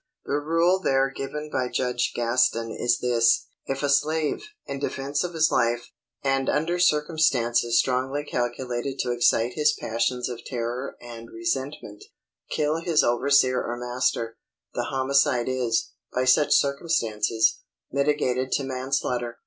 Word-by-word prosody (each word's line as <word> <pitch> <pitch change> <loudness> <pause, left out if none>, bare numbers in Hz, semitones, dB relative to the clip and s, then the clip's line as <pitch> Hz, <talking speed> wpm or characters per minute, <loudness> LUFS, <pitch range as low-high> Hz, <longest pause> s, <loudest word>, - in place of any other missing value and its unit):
The 145 - 0
rule 165 +5 +2
there 135 -5 +2
given 150 +2 -5
by 130 -1 0
Judge 125 -1 -1
Gaston 115 -1 +1
is 120 +1 +1
this: 115 -2 +3 0.2
'If 135 +1 -3
a 145 - +1
slave, 155 - +1 0.2
in 140 - -5
defence 140 +1 -2
of 175 -1 -5
his 160 0 +3
life, 120 0 0 0.3
and 135 -1 +1
under 170 +4 0
circumstances 150 -8 +2
strongly 130 +3 0
calculated 125 0 -3
to 125 - -2
excite 120 0 +2
his 150 +1 +3
passions 115 +1 -1
of 120 -1 -7
terror 125 +1 -4
and 115 -1 -10
resentment, 140 -10 -4 0.5
kill 150 +1 0
his 165 -2 +2
overseer 130 +1 +3
or 120 - -4
master, 120 -2 -1 0.4
the - - -2
homicide 135 -1 +1
is, 125 -3 0 0.2
by 125 - 0
such 145 +4 +4
circumstances, 115 -7 +1 0.3
mitigated 135 -2 0
to 140 - +1
manslaughter. 130 -2 -2
130 Hz, 135 wpm, -25 LUFS, 120-145 Hz, 0.5 s, such